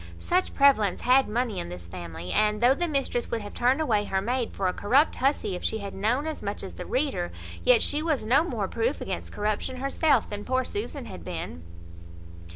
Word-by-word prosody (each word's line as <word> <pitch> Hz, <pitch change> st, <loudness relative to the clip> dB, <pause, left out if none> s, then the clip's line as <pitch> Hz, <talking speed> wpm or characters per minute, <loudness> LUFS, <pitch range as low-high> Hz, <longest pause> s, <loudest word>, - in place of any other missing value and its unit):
Such 365 Hz, -, 0 dB
prevalence 240 Hz, -10 st, +4 dB
had 260 Hz, +2 st, +4 dB
money 230 Hz, -1 st, -1 dB
in 85 Hz, -, -5 dB
this 90 Hz, -1 st, -8 dB
family; 85 Hz, 0 st, -7 dB
and 210 Hz, 0 st, +2 dB
though 245 Hz, +3 st, +5 dB
the 345 Hz, +5 st, -1 dB
mistress 275 Hz, -5 st, -1 dB
would 230 Hz, -, -2 dB
have 205 Hz, -, -8 dB
turned 250 Hz, +4 st, +2 dB
away 220 Hz, -9 st, +1 dB
her 190 Hz, -1 st, 0 dB
maid 240 Hz, +4 st, -1 dB
for 190 Hz, -, -1 dB
a 180 Hz, -, 0 dB
corrupt 270 Hz, +9 st, +3 dB
hussy, 270 Hz, -6 st, +1 dB
if 180 Hz, -, -7 dB
she 220 Hz, -, 0 dB
had 200 Hz, -2 st, -6 dB
known 230 Hz, +9 st, 0 dB
as 315 Hz, -1 st, -4 dB
much 205 Hz, 0 st, -4 dB
as 195 Hz, -, -7 dB
the -, -, -8 dB
reader, 260 Hz, -, -1 dB, 0.3 s
yet 250 Hz, -2 st, +5 dB
she 295 Hz, +1 st, +1 dB
was 310 Hz, -8 st, 0 dB
no 260 Hz, +7 st, +4 dB
more 350 Hz, -, -2 dB
proof 465 Hz, +2 st, -1 dB
against -, -, -4 dB
corruption 210 Hz, +4 st, -2 dB
herself 275 Hz, 0 st, +2 dB
than 205 Hz, 0 st, -6 dB
poor 260 Hz, 0 st, 0 dB
Susan 355 Hz, -, -5 dB
had 85 Hz, -, -9 dB
been. 80 Hz, 0 st, -5 dB
240 Hz, 210 wpm, -27 LUFS, 205-275 Hz, 0.3 s, though